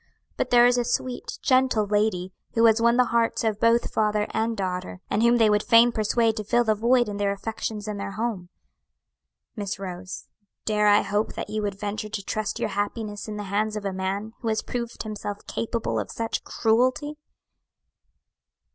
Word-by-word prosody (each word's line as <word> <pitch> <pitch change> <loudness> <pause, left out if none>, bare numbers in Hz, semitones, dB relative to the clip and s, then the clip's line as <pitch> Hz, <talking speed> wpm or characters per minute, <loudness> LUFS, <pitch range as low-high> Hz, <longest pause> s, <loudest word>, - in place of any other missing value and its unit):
but - - -1
there 240 0 +6
is 245 0 +4
a - - +1
sweet, 245 +1 -3
gentle 255 -4 +3
lady 205 -3 0 0.2
who 230 0 +5
has 225 0 +5
won 235 +1 +4
the 250 - +5
hearts 230 0 +1
of 215 -2 0
both 230 +1 +2
father 210 -1 +1
and 225 +1 -1
daughter, 185 -1 -3
and 205 - +1
whom 235 +1 +5
they 225 -2 +5
would 210 0 +3
fain 235 +1 +6
persuade 225 0 +1
to 215 - -4
fill 240 +4 +2
the 220 -2 +2
void 240 +3 +3
in 205 -1 -4
their 200 -1 +1
affections 215 +1 -4
and 210 -1 -4
their 200 0 -5
home. 215 -6 -3 1.1
"Miss 200 -3 -4
Rose, 185 -1 -7 0.4
dare 210 -1 +2
I 205 0 +5
hope 205 +2 -1
that - - -5
you 215 0 -1
would 200 -2 -3
venture 210 +1 -4
to 205 -1 -4
trust 215 +1 -3
your - - -1
happiness 205 +1 -3
in 210 -1 -5
the 210 - -4
hands 210 +2 -1
of 210 -1 -5
a 195 - -1
man 195 +4 -3
who 230 - -5
has 220 -1 0
proved 235 -1 -4
himself 205 -1 -6
capable 230 0 -2
of - - -4
such 230 0 -3
cruelty?" 255 +7 +1
215 Hz, 190 wpm, -25 LUFS, 205-230 Hz, 1.1 s, there